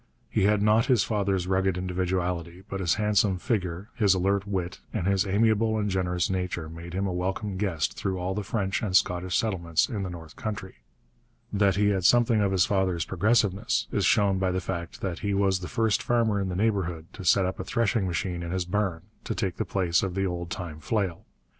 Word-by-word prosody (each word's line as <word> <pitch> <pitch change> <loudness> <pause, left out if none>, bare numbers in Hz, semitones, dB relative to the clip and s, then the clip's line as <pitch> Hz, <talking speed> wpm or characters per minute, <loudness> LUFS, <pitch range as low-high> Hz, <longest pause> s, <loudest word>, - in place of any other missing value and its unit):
He - - +2
had 105 0 +3
not 110 +2 +4
his 125 -7 +4
father's 100 -4 0
rugged 95 0 +1
individuality, 90 -1 -2
but 95 -2 -4
his 85 -4 +2
handsome 105 -2 +2
figure, 95 +1 -2
his 100 -5 +3
alert 100 +2 +1
wit, 90 -7 -3
and - - -2
his 100 -1 +2
amiable 110 +2 +2
and 105 -1 -1
generous 90 -1 0
nature 90 -3 -2
made 85 +2 -8
him 95 +1 0
a 95 - -1
welcome 95 +3 -2
guest 85 -10 -1
through 95 -2 -2
all 90 +1 -2
the 105 - -2
French 100 0 -1
and 95 -5 +3
Scottish 90 0 0
settlements 85 -7 +1
in 110 -6 -3
the 95 - -3
north 80 -3 -10
country. 100 -3 -5 0.8
That 100 -2 +3
he 105 +1 +3
had 95 -3 0
something 120 +2 +4
of 100 -1 +2
his 95 -2 +3
father's 95 -5 0
progressiveness 110 +3 +1
is 100 - 0
shown 100 -2 +3
by 95 -1 +1
the 90 0 0
fact 85 -2 -5
that 90 -4 -3
he 100 -1 -1
was 95 -1 +2
the 90 - -6
first 110 -2 +1
farmer 115 -4 +1
in 95 - -2
the 90 - -3
neighbourhood 95 -6 0
to 100 - -8
set 95 +2 +4
up 95 +1 -3
a - - -2
threshing 110 -1 0
machine 90 0 -2
in 85 - -5
his 90 0 -1
barn, 90 -3 -1 0.2
to - - -2
take 95 -3 -2
the 110 - -1
place 90 -2 +1
of 95 -2 -3
the 95 0 0
old 85 -2 -3
time 85 -3 -6
flail. 95 -1 -2
95 Hz, 210 wpm, -27 LUFS, 90-105 Hz, 0.8 s, not